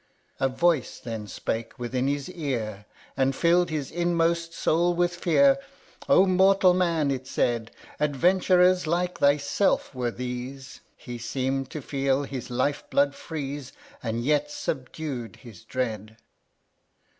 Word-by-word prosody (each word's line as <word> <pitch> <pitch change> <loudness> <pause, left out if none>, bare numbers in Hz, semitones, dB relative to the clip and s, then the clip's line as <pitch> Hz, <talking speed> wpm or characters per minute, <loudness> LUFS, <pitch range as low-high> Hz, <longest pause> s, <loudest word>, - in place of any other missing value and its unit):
16. - - +2
A 130 - -14
voice 170 -6 +2
then 110 -3 -6
spake 115 +4 -4
within 125 +1 -1
his 140 0 -1
ear, 115 - -4 0.3
And 135 0 +1
filled 175 +2 +3
his 150 -4 -3
inmost 170 -1 +1
soul 170 +1 +1
with 175 0 +1
fear, 270 - +4
â 275 0 -20
" - - -22
O 190 - +7
mortal 190 0 +5
Man," 170 -5 +1
it 130 -1 -4
said, 115 -3 0 0.2
" - - -21
Adventurers 180 +4 +3
like 175 +2 -1
thyself 145 +7 +2
were 125 -2 -1
these! 125 +2 -6 0.2
He 120 -1 -8
seem'd 130 +3 -2
to 155 - -6
feel 135 0 0
his 135 -2 -6
life 130 +4 0
blood 140 0 +2
freeze, 140 -3 -6 0.3
And 115 0 -2
yet 150 0 +2
subdued 130 -3 -4
his 115 -8 -14
dread. 110 -4 -4
140 Hz, 145 wpm, -26 LUFS, 125-170 Hz, 0.3 s, O